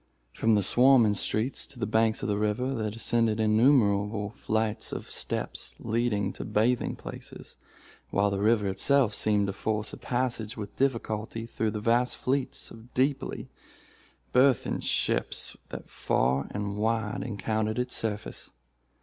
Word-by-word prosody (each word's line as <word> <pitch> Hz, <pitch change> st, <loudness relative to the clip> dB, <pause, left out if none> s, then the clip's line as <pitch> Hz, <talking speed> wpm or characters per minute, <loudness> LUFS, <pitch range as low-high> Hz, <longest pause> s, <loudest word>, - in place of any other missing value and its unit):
From 110 Hz, -1 st, +2 dB
the 105 Hz, -, +2 dB
swarming 120 Hz, 0 st, +5 dB
streets 110 Hz, +5 st, -1 dB
to -, -, -14 dB
the 115 Hz, -, -1 dB
banks 110 Hz, +3 st, +1 dB
of -, -, -1 dB
the 105 Hz, -1 st, 0 dB
river, 105 Hz, +5 st, 0 dB
there 110 Hz, -4 st, -2 dB
descended 115 Hz, 0 st, +1 dB
innumerable 105 Hz, -3 st, +3 dB
flights 110 Hz, -1 st, -2 dB
of -, -, -6 dB
steps -, -, -3 dB
leading 115 Hz, -2 st, 0 dB
to -, -, -6 dB
bathing 120 Hz, +4 st, +1 dB
places, -, -, -10 dB, 0.5 s
while 100 Hz, +1 st, +2 dB
the 100 Hz, -, -1 dB
river 105 Hz, 0 st, +3 dB
itself 110 Hz, +5 st, +2 dB
seemed 105 Hz, 0 st, +2 dB
to 100 Hz, -, -2 dB
force 105 Hz, +2 st, -2 dB
a -, -, -6 dB
passage 120 Hz, -3 st, -2 dB
with 105 Hz, -2 st, -7 dB
difficulty 115 Hz, -4 st, -1 dB
through 115 Hz, -1 st, -2 dB
the 105 Hz, 0 st, -3 dB
vast 120 Hz, +3 st, +2 dB
fleets 135 Hz, 0 st, -2 dB
of 115 Hz, +2 st, -14 dB
deeply 135 Hz, +2 st, -1 dB, 0.8 s
burthened 130 Hz, -2 st, +3 dB
ships -, -, -1 dB
that -, -, -8 dB
far 65 Hz, +3 st, 0 dB
and 100 Hz, 0 st, -4 dB
wide 110 Hz, +2 st, 0 dB
encountered 110 Hz, 0 st, -2 dB
its 125 Hz, 0 st, -2 dB
surface. 105 Hz, -2 st, -4 dB
110 Hz, 145 wpm, -28 LUFS, 105-120 Hz, 0.8 s, swarming